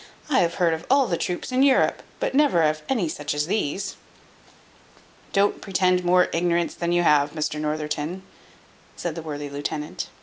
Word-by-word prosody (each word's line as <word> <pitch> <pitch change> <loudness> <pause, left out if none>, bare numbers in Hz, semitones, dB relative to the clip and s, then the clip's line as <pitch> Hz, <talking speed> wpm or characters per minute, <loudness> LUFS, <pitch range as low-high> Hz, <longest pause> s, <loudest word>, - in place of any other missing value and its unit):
I 265 - +4
have 170 -1 +1
heard 175 -3 +2
of 160 +1 -4
all 275 +1 +5
the 175 - 0
troops 180 +7 -3
in 255 +1 +2
Europe, 275 -1 +3 0.2
but - - -1
never 275 - +4
of 155 0 +1
any 230 -10 +1
such 145 -1 -3
as 150 0 0
these." 190 -1 -2 1.3
"Don't 200 +1 +2
pretend 185 -2 +2
to 180 - -8
more 180 0 +5
ignorance 170 0 +1
than 170 0 -2
you 175 0 +2
have, 145 -2 +3
Mr 155 -1 -2
Northerton," 155 +3 -3 0.7
said 175 - -4
the 165 - -6
worthy 145 -2 -5
lieutenant. 145 +2 -4
170 Hz, 175 wpm, -24 LUFS, 150-185 Hz, 1.3 s, all